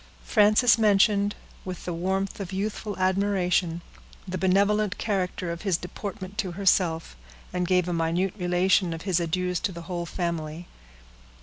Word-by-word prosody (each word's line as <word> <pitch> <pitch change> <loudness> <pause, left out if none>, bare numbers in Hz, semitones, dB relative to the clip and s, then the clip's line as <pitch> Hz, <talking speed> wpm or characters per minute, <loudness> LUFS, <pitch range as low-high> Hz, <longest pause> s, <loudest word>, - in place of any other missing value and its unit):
Frances 215 +2 +4
mentioned, 205 -1 +3 0.3
with 185 -2 -7
the 175 - -2
warmth 190 +4 -2
of 195 -2 -5
youthful 205 +2 -3
admiration, 185 -3 +1 0.5
the 185 0 -3
benevolent 200 +2 +2
character 185 -4 -2
of 170 - -6
his 195 -5 +1
deportment 195 +2 -7
to 185 -5 -1
herself, 175 - +1 0.4
and 180 -1 -1
gave 180 -1 +2
a 175 - -1
minute 170 +3 0
relation 180 -1 +2
of 165 - -9
his 185 -3 +1
adieus 180 +1 -1
to 205 - -2
the 170 -1 -8
whole 175 0 -4
family. 170 -1 -4
185 Hz, 145 wpm, -26 LUFS, 175-200 Hz, 0.5 s, Frances